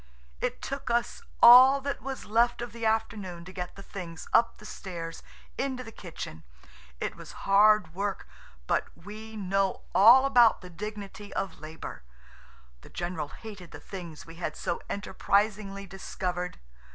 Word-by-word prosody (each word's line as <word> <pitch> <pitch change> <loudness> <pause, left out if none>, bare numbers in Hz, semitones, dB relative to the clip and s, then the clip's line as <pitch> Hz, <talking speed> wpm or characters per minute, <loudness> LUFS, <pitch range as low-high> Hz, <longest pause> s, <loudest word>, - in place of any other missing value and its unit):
It - - -3
took 275 -1 -4
us 235 0 0 0.2
all 255 +3 +10
that 280 +1 -3
was 270 0 -5
left 235 +3 +2
of 240 - -6
the 230 -1 -1
afternoon 205 -6 -2
to 185 - -10
get 180 -1 -5
the 195 - -10
things 170 -5 -8
up 230 0 +4
the 215 - -14
stairs 170 -5 -7 0.4
into 260 -2 -2
the 225 - -10
kitchen. 160 - -8 0.6
It - - -3
was - - -11
hard 210 -2 +5
work, 200 +2 -3 0.4
but - - +1
we 215 +4 -10
know 195 -1 0
all 240 +7 +8
about 240 -4 +5
the 180 -1 -11
dignity 205 +2 -7
of 195 - -3
labour. 155 +1 -8 0.8
The - - -14
general 175 -3 -3
hated 185 +3 -10
the - - -10
things 175 -5 -8
we 165 0 -12
had 175 - -3
so 175 - -2
enterprisingly 200 0 0
discovered. 180 -1 -4
200 Hz, 150 wpm, -28 LUFS, 180-225 Hz, 0.8 s, all